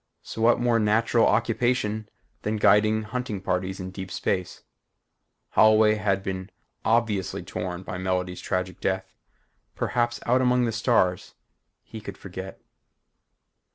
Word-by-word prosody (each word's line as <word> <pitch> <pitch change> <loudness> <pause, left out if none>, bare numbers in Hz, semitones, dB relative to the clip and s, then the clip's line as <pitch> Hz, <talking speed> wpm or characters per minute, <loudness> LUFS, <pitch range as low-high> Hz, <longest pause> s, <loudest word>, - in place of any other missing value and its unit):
So 115 - -6
what 115 +1 +4
more 120 -1 +2
natural 110 +2 +3
occupation 110 -1 0 0.3
than 105 +1 -1
guiding 110 +1 +4
hunting 110 -2 -4
parties 95 0 -2
in 95 0 -6
deep 95 -1 -7
space? 90 0 -2 0.9
Holloway 110 0 +5
had 100 -2 0
been 95 -1 -4 0.3
obviously 105 -6 0
torn 90 -1 -5
by 90 - -6
Melody's 90 -1 -2
tragic 90 0 -3
death. 95 0 -2 0.6
Perhaps 120 -1 0
out 125 +2 +3
among 125 -1 +3
the 115 - 0
stars 105 -5 +1 0.5
he 110 - -9
could 100 -2 -8
forget. 95 0 -8
105 Hz, 125 wpm, -25 LUFS, 95-115 Hz, 0.9 s, Holloway